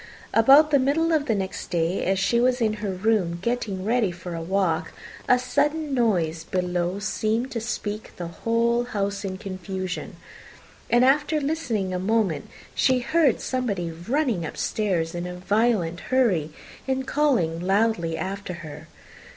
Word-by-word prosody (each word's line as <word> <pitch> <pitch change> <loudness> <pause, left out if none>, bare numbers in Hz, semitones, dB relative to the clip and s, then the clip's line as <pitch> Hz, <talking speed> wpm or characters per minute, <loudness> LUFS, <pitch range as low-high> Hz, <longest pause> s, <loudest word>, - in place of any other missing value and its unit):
About 275 +7 +6
the 285 - +5
middle 305 +5 +2
of 300 -2 +1
the 225 - +2
next 190 -1 -4
day, 170 +2 0
as 190 +1 +1
she 195 +5 +2
was 250 +1 +2
in 220 -2 +2
her 210 - -2
room 190 -2 +1
getting 200 -3 -2
ready 225 -2 +2
for 175 0 -8
a 165 - -4
walk, 165 -2 0 0.4
a 250 - +6
sudden 295 +4 0
noise 175 -10 +1
below 180 +1 -1
seemed 220 +4 -1
to 230 - -3
speak 215 -2 -4
the 175 - -5
whole 230 +7 0
house 200 -3 -2
in 190 -1 -4
confusion; 185 -1 -5 0.7
and, 240 +1 +5
after 295 +3 +3
listening 250 -11 -1
a 180 - -1
moment, 190 -6 0 0.2
she 260 -1 +3
heard 275 +2 +2
somebody 200 -10 -2
running 225 - -1
upstairs 170 -2 -1
in 175 0 -4
a 180 - -6
violent 190 -2 +1
hurry, 205 - +1 0.4
and 265 0 -1
calling 250 - +1
loudly 190 -3 +1
after 195 0 -4
her. 150 - -9
205 Hz, 150 wpm, -24 LUFS, 180-245 Hz, 0.7 s, About